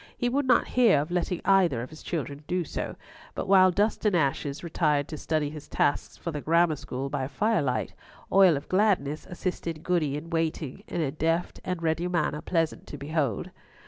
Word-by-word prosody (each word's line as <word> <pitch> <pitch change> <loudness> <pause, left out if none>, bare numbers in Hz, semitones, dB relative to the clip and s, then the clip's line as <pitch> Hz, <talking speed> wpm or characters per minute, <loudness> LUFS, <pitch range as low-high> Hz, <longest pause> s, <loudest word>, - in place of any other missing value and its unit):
He 245 - 0
would 275 +2 0
not 245 - +4
hear 235 - +5
of 150 +4 -3
letting 180 0 -1
either 180 -12 +3
of 125 - -9
his 155 - -11
children 145 -3 -4
do 180 0 0
so; - - -5 0.4
but - - -3
while 190 -1 +7
Dust 205 +4 0
and 210 -4 +3
Ashes 140 -1 0
retired 150 -4 +1
to - - -5
study 155 -2 -1
his 150 -2 -9
tasks 145 - 0
for 170 - -4
the 150 -2 -4
Grammar 165 +1 +3
School 135 -1 -5
by 135 -2 -2
firelight, 140 - 0 0.4
Oil 190 -6 +6
of 140 - -8
Gladness 185 -7 +1
assisted 170 -3 -4
Goody 155 -6 +1
in 165 +3 -8
waiting, 165 0 -2
in 170 - -2
a 140 -4 0
deft 165 +3 -1
and 180 -2 -3
ready 165 +2 0
manner 155 -4 0
pleasant 165 -3 -1
to 145 - -7
behold. 140 -6 -2
165 Hz, 190 wpm, -27 LUFS, 145-180 Hz, 0.4 s, while